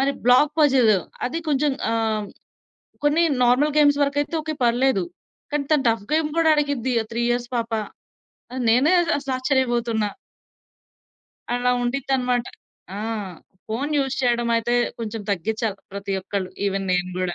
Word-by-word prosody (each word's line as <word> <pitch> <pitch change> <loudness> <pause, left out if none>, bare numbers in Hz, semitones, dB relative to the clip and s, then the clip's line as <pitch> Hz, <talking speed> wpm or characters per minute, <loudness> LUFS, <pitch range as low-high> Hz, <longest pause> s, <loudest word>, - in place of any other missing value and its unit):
మరి 275 +1 +2
black 285 +5 +5
puzzle 260 -7 +5 0.3
అది 320 +7 -3
కొంచెం. 290 0 +2 0.2
ఆహ్, 220 -2 0 0.8
కొన్ని 300 +4 +3 0.2
నార్మల్ 280 +5 +3
గేమ్స్ 290 -1 +5
వరకైతే 285 +3 -1
ఓకే 310 0 -4
పర్లేదు. 240 -5 +2 0.5
కానీ 295 -1 0
తను 285 -3 +3
టఫ్ 225 -3 0
గేమ్ 310 -1 +2
గూడా 325 -1 +4
అడిగిద్ది. 285 -4 0
ఆ - - -11
3 235 +1 -1
ఇయర్స్ 240 0 -1
పాప. 230 0 -2 0.8
ఆహ్, 260 - -3
నేనే 265 +10 +4 0.3
అసలు 275 -2 -4
ఆశ్చర్యబోతున్నా. 240 -5 0 1.4
అలా 245 0 +1
ఉండిద్దన్నమాట. 250 -1 0 0.5
ఆ! - - -4 0.7
ఫోను 275 +7 -2
యూజ్ 270 -1 0
చేయడం 240 -1 +1
అయితే 235 +1 -1 0.3
కొంచెం 225 -1 -4
తగ్గించాలి. 215 +2 -2 0.2
ప్రతి 200 0 -4
ఒక్కళ్ళు 190 -1 -3 0.2
ఈవెన్ 195 0 -1
నేను 180 0 +1
గూడా. 180 -1 -1
245 Hz, 140 wpm, -23 LUFS, 225-280 Hz, 1.4 s, black